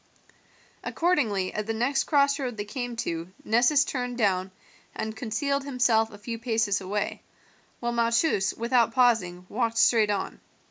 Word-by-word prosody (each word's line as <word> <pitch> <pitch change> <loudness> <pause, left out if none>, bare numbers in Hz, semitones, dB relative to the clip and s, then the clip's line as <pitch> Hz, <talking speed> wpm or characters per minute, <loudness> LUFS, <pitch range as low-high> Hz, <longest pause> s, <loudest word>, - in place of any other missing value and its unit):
Accordingly 230 - 0
at 210 0 -3
the 225 - -2
next 270 +4 +1
crossroad 280 -5 +1
they 205 - -3
came 245 +1 -5
to 170 -5 -4
Nessus 250 +6 +4
turned 245 -2 -3
down 190 -4 +1 0.5
and 220 0 -4
concealed 280 +5 -2
himself 240 -5 +2
a 205 - -11
few 230 +2 -6
paces 225 -4 0
away, 200 +2 -3 0.6
while 240 0 -1
Malchus, 230 -3 +2
without 235 0 +2
pausing, 195 -8 +2
walked 230 +1 -1
straight 225 -2 +4
on. 200 -2 -2
230 Hz, 140 wpm, -26 LUFS, 210-250 Hz, 0.6 s, Nessus